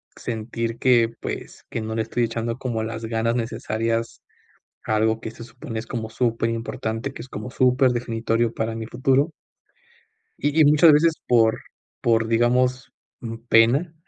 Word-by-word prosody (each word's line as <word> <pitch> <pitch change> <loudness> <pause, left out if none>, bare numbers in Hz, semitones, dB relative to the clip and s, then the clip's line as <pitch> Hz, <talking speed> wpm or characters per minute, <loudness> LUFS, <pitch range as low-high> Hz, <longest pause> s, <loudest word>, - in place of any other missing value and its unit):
sentir 115 0 -4
que, 120 -3 +4
pues, - - -6
que 115 - -3
no 110 0 -4
le 110 - 0
estoy 120 - -1
echando 115 +1 -3
como 120 -4 -3
las 110 0 -5
ganas 115 +1 0
necesarias, 115 0 -2 0.7
a 110 - +1
algo 110 +1 +1
que 110 - -6
se 115 +1 -11
supone 115 -1 -7
es 110 - -6
como 110 -2 -4
superimportante, 115 +1 -2
que - - -10
es 130 - -11
como 105 +1 -7
superdefinitorio 120 -3 +1
para 110 0 -2
mi 115 0 -5
futuro 135 +6 +1 1.1
y 145 +2 0
y 150 - +7
muchas 150 +2 +7
veces 160 +2 +4
por, 115 -2 +4 0.4
por, 115 -1 +2
digamos, 125 +2 +1 0.6
pena, 135 +9 +4
115 Hz, 150 wpm, -23 LUFS, 115-125 Hz, 1.1 s, y